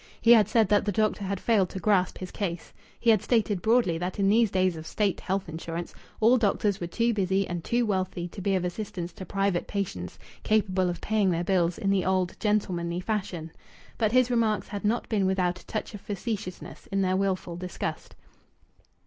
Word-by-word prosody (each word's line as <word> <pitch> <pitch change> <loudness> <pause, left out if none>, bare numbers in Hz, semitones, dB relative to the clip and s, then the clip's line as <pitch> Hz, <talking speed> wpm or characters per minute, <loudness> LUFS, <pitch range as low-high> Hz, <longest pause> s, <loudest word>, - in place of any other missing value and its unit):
He 235 - +5
had 220 -3 +7
said 225 -3 +3
that 205 - +4
the 205 - +1
doctor 215 0 0
had 195 0 -2
failed 200 -5 +2
to 190 - -6
grasp 185 -1 +2
his 185 -1 -7
case. 175 -4 -4 0.3
He 230 - +4
had 215 -4 +3
stated 215 -6 +1
broadly 220 -7 +2
that 180 +1 -3
in 195 -1 +2
these 225 +1 +4
days 185 -2 +1
of 160 0 -8
State 205 +2 0
health 190 0 -2
insurance 165 +1 -5 0.3
all 230 +3 +5
doctors 205 -2 +1
were 175 - -2
too 230 +7 +1
busy 195 -1 +1
and 175 -1 -4
too 240 +4 +1
wealthy 185 -4 -1
to 195 - -9
be 195 +1 +1
of 180 -1 0
assistance 180 -2 -5
to 185 - -9
private 195 -3 0
patients 95 - -4 0.2
capable 190 -4 +1
of 175 - -5
paying 215 -3 +1
their 170 -1 0
bills 175 -2 +1
in 195 - 0
the 195 -2 +2
old 185 -1 0
gentlemanly 180 -5 0
fashion. 185 -5 -3 0.5
But 215 -2 +2
his 255 0 +3
remarks 225 -4 +1
had 205 -1 -5
not 220 +3 0
been 200 -4 +1
without 180 -2 0
a - - -23
touch 215 - -4
of 205 - -8
facetiousness 205 -2 -5
in 195 -1 0
their 185 0 +1
wilful 190 -3 -1
disgust. 180 0 -5
195 Hz, 200 wpm, -27 LUFS, 180-215 Hz, 0.5 s, had